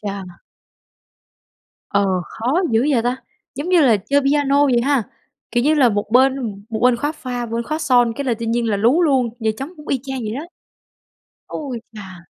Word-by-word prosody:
cha! 195 -4 -7 1.5
Ờ, 200 - +2 0.2
khó 255 +10 -1
dữ 230 +4 +2
vậy 245 -5 +2
ta! 245 +2 0 0.4
Giống 285 +6 -5
như 365 -2 +4
là 245 -8 +5
chơi 280 +9 +1
piano 285 0 +2
vậy 245 -3 +3
ha, 270 0 +1 0.5
kiểu 240 0 +1
như 310 +2 +4
là, 270 -5 +5
một 205 -1 -2
bên 260 +2 +4 0.3
một 220 -1 -3
bên 250 -1 +4
khóa 290 +5 -2
pha, 245 -5 -5
một 225 - -10
bên 235 +1 -1
khóa 310 +5 -3
son 245 -6 +3
cái 280 - -3
là 245 -3 +1
tự 230 - -4
nhiên 235 +1 0
là 205 - +1
lú 240 - +3
luôn, 265 -7 +2
giờ 220 -1 +1
trống 270 +6 -6
cũng 300 0 -13
y 265 - 0
chang 265 -1 -5
vậy 220 -1 -4
đó. 300 +6 -5 1.0
Ôi 265 -6 -5
chà! 190 -5 -10
250 Hz, 205 wpm, -20 LUFS, 230-280 Hz, 1.5 s, là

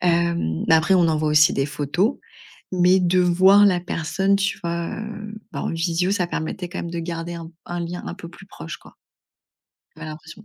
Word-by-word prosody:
Hem, 170 - +1
mais 160 - +7
après 170 +4 +4
on 175 -2 +4
envoie 155 -1 +1
aussi 150 +1 +5
des 135 +1 0
photos. 150 - -1 0.6
Mais 180 +1 +4
de 180 0 +2
voir 185 +3 +6
la 180 -3 +3
personne, 180 +3 0
tu 200 0 -1
vois? 170 0 -2
Heu, 215 -1 -7 0.2
bah, - - -4
en - - -2
visio, 170 +2 0
ça 200 -3 +1
permettait 175 +2 -4
quand 185 - -7
même 170 - -5
de 170 - -4
garder 170 0 -4
un 165 -1 -8 0.2
un 175 0 -4
lien 175 +1 -5
un - - -5
peu 175 -3 -10
plus 195 +3 -15
proche 80 - -9
quoi - - -18 1.0
j'avais 160 0 -8
l'impression. 160 +6 -10
170 Hz, 200 wpm, -22 LUFS, 165-185 Hz, 1.0 s, mais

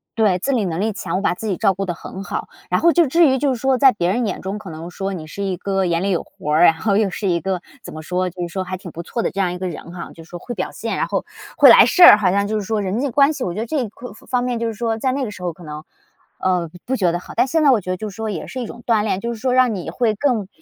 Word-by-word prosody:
对， 205 -5 +2
自 275 +9 -1
理 235 -5 +1
能 170 -3 -2
力 215 +2 0
强， 190 - -3
我 - - -2
把 - - +1
自 220 - -8
己 190 -4 -1
照 200 -3 +3
顾 195 +2 -4
得 175 - -2
很 190 +3 -8
好。 - - -4 0.2
然 - - +2
后 340 0 +4
就 345 -1 +4
至 330 +4 +4
于 265 -1 +2
就 275 0 +1
是 245 - -5
说， 265 0 +2
在 265 +1 +6
别 175 -7 -1
人 240 +2 0
眼 - - -3
中 195 +2 -4
可 210 -3 -9
能 160 +1 -8
说 195 +2 -4
你 165 -5 -6
是 200 +6 -6
一 190 -2 -2
个 195 +1 -1
眼 170 -1 0
里 200 - 0
有 180 -4 0
活 150 - -5
儿， 160 +3 +5
然 165 - +7
后 200 +4 0
又 210 -1 +2
是 200 +2 -4
一 170 -2 +1
个， 190 -2 -2 0.2
怎 - - -9
么 155 - -7
说 180 +3 -1
就 180 +1 -9
是 175 - -2
说 185 +2 -4
还 185 0 -5
挺 185 -1 -10
不 170 - -6
错 235 - -3
的 - - 0
这 195 - -2
样 180 -2 0
一 180 - -5
个 185 +1 -3
人 170 0 -8
哈。 175 -1 -8
就 165 - -12
是 160 - -20
说 175 - -8
会 240 +7 -7
表 185 - -3
现， 225 - -4
然 - - 0
后 - - -2 0.3
会 - - +8
来 - - +9
事 365 - +1
儿， 345 - +11
好 190 -4 +2
像 200 +1 +1
就 215 +1 -1
是 205 - -3
说 215 0 -1
人 200 +5 -2
际 285 - 0
关 280 +4 +4
系， 280 -4 -4
我 175 - -2
觉 200 - -5
得 225 - -2
这 250 -3 -2
方 245 +2 -10 0.2
方 250 -1 +1
面 245 -1 -1
就 230 0 -2
是 225 - -3
说 225 +1 -2
在 260 +3 0
那 270 0 -1
个 210 - -6
时 185 - -10
候 175 - -1
可 170 +1 -14
能， 150 0 -7 0.6
呃， 180 -3 0 0.2
不 260 - -1
觉 185 -7 +2
得 175 - -2
好。 - - -11
但 - - +3
现 320 +5 +1
在 295 - +5
我 230 -6 +3
觉 185 - -8
得 185 - -2
就 215 +3 -5
是 195 - -12
说 220 0 -4
也 185 -6 -5
是 260 - -5
一 - - -3
种 240 +2 -10
锻 225 -4 +2
炼， 205 -3 -1
就 235 +3 -3
是 225 - -9
说 255 -1 +1
让 255 -3 +3
你 180 - -5
会 230 -4 0
更 230 -5 0
200 Hz, 375 characters per minute, -20 LUFS, 180-240 Hz, 0.6 s, 儿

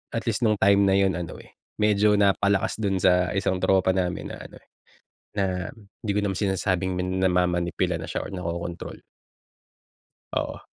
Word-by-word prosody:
At 115 - -3
least 115 +1 0
nung 110 -2 +3
time 100 0 +5
na 95 - +4
'yon 95 -2 +3
ano 85 - -6
eh, - - -17 0.2
medyo 105 0 +4
napalakas 100 0 +2
do'n 100 -3 0
sa 90 -1 +3
isang 95 -1 0
tropa 95 0 +3
namin 90 -1 -2
na - - -7
ano, - - -14 0.8
na, 100 -2 +1 0.6
'di 105 - -1
ko - - +3
naman 100 -2 -1
sinasabing 95 -2 0
min 90 +1 -2
namamanipula 90 -1 +1
na 80 - -6
siya - - -3
or - - -10
nakokontrol. 85 -1 -5 1.4
Oo. - - -2
95 Hz, 160 wpm, -25 LUFS, 90-100 Hz, 1.4 s, time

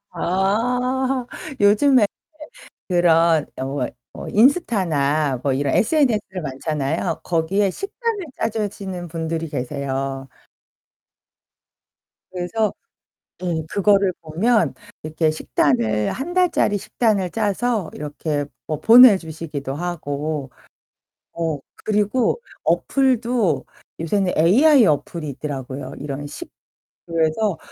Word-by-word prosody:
아. 250 +9 0 0.3
요즘에 215 +4 +5 0.8
그런 170 -3 +3
어 130 - -3
뭐 135 -1 -2 0.3
어 - - -7
인스타나 165 - +2
뭐 140 -2 +1
이런 140 +1 0
SNS들 220 - +1
많잖아요. 150 +2 -2
거기에 180 +4 +1
식단을 405 - -4
짜주시는 200 -5 -3
분들이 165 0 -3
계세요. 135 0 -4 2.0
그래서 185 +4 -1 0.7
예, 165 -3 -1
그거를 200 -1 +3
보면 205 +9 +1 0.3
이렇게 155 +1 0
식단을 120 -8 +1
1 300 +7 -5
달짜리 355 - +2
식단을 210 -3 0
짜서 215 -2 -1
이렇게 150 0 -3 0.2
뭐 155 -2 -3
보내주시기도 165 - +5
하고 150 -4 -4 0.8
어 165 -3 -2 0.3
그리고 215 - +1 0.2
어플도 250 -5 +1 0.4
요새는 180 +3 0
AI 245 - +6
어플이 155 0 -1
있더라고요. 135 -1 -6
이런 145 0 -5
식 315 - -9 0.6
그래서 165 +3 0
175 Hz, 220 characters per minute, -21 LUFS, 150-220 Hz, 2.0 s, AI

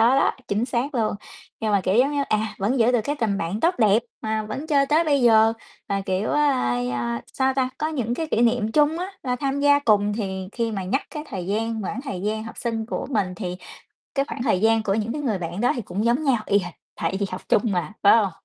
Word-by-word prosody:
đó, - - +3 0.2
chính 210 +4 0
xác 255 +3 -2
luôn. 220 -3 0 0.4
Nhưng 220 -1 -1
mà, 200 -1 +3
kiểu 185 +1 +1
giống 260 +5 +4
như, 285 -1 0
à, 215 0 0
vẫn 225 +7 0
giữ 230 +2 +4
được 245 -3 +2
cái 290 +6 -1
tình 215 -4 0
bạn 180 +4 -2
tốt 345 +2 +2
đẹp, 215 -2 +4 0.2
mà 220 0 -1
vẫn 220 +9 -6
chơi 280 -3 +3
tới 305 +4 +3
bây 285 -4 +2
giờ 225 -2 +5 0.4
là, 195 0 0
kiểu, 195 +1 -1
ơ, - - +2 0.5
ơ, 120 -1 -2 0.2
sao 265 0 +1
ta, 260 -1 0
có 310 - -1
những 250 -7 -2
cái 320 +5 -3
kỷ 235 - +1
niệm 230 -2 +2
chung 300 +5 +3
á, 360 - -2 0.2
là 250 -2 0
tham 275 +2 -2
gia 285 0 +5
cùng. 210 -5 +2
Thì 190 -3 -4
khi 230 -1 -2
mà 195 -3 -3
nhắc 200 +10 0
cái 300 - -6
thời 185 -3 -5
gian 220 +2 -1
quãng 210 +6 -4
thời 195 -11 -5
gian 215 +2 -2
học 225 - -9
sinh 225 -2 -2
của 235 - -4
mình 200 -8 0
thì 180 -2 -5 0.6
cái 275 0 +1
khoảng 240 - -5
thời 210 -6 +1
gian 225 0 +3
của 195 -2 0
những 220 +2 -1
cái 295 - -3
người 230 -8 0
bạn 175 +3 -4
đó 245 - +3
thì 240 - -3
cũng 200 +2 -3
giống 240 +6 +2
nhau 250 -7 +2
y 200 - +3
hệt, 175 -3 -6 0.2
tại 170 +4 -2
vì 200 - +1
học 185 - -5
chung 210 - +4
mà, 180 -1 -2
phải 200 - +8
hông? 205 -4 +1
225 Hz, 255 wpm, -23 LUFS, 200-265 Hz, 0.6 s, phải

